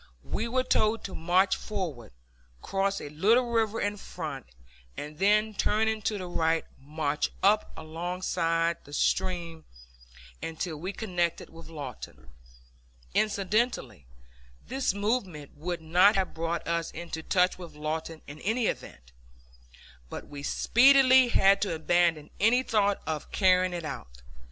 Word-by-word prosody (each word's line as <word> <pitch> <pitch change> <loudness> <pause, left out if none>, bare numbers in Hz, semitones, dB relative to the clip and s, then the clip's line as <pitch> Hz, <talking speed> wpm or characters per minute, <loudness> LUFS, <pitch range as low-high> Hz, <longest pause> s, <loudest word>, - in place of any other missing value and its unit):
We 225 - -3
were 255 +2 +1
told 220 -3 +1
to 195 - -6
march 180 +4 +2
forward, 170 - -5 0.5
cross 195 0 0
a 145 - -7
little 225 - +2
river 225 -1 +1
in 205 0 -1
front, 155 -9 -7 0.5
and 150 +1 -7
then, 210 +2 +3
turning 220 +2 +1
to 210 0 -1
the 185 - -5
right, 165 -2 0
march 150 +1 -2
up 210 +2 +3
alongside 165 0 -1
the 145 - -14
stream 170 -1 -1 0.8
until 165 0 -4
we 180 +6 -4
connected 180 -6 -2
with 165 0 -12
Lawton. 125 - -9 0.8
Incidentally, 200 - 0 0.6
this 265 0 0
movement 200 - -2
would 170 +3 -4
not 180 +6 +5
have 190 -1 0
brought 165 +1 -3
us 170 -1 -1
into 165 -1 -6
touch 180 +2 +2
with 170 -4 -10
Lawton 155 +1 -4
in 145 +1 -10
any 225 +4 0
event. - - -5 1.0
But - - -7
we 145 -1 -8
speedily 260 - +5
had 195 -4 +4
to 190 -5 0
abandon 165 -1 +1
any 235 +5 +4
thought 205 -4 +1
of 155 -2 -4
carrying 185 -2 +3
it 170 -2 -4
out. - - -8
180 Hz, 135 wpm, -28 LUFS, 160-210 Hz, 1.0 s, not